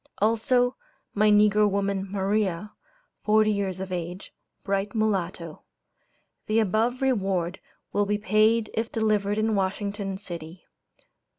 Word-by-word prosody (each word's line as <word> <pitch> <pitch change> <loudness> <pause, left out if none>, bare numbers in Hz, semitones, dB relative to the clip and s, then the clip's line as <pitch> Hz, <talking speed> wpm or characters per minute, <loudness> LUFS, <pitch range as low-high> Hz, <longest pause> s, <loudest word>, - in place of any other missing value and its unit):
Also, 245 +4 +2 0.4
my 215 +1 +3
negro 210 0 +5
woman, 200 -1 -1
'Maria,' 200 0 -1 0.5
forty 215 0 +4
years 195 -3 -2
of 190 0 -5
age, 175 +1 -5 0.3
bright 195 +1 -2
mulatto. 185 -6 -2 0.9
The 215 - +1
above 225 +5 +1
reward 195 -8 0 0.3
will 205 0 +1
be 210 +1 +1
paid 215 +2 +2
if 225 +1 -2
delivered 210 -2 +1
in 220 0 +1
Washington 200 0 -2
city. 175 -3 -9
205 Hz, 115 wpm, -26 LUFS, 190-215 Hz, 0.9 s, negro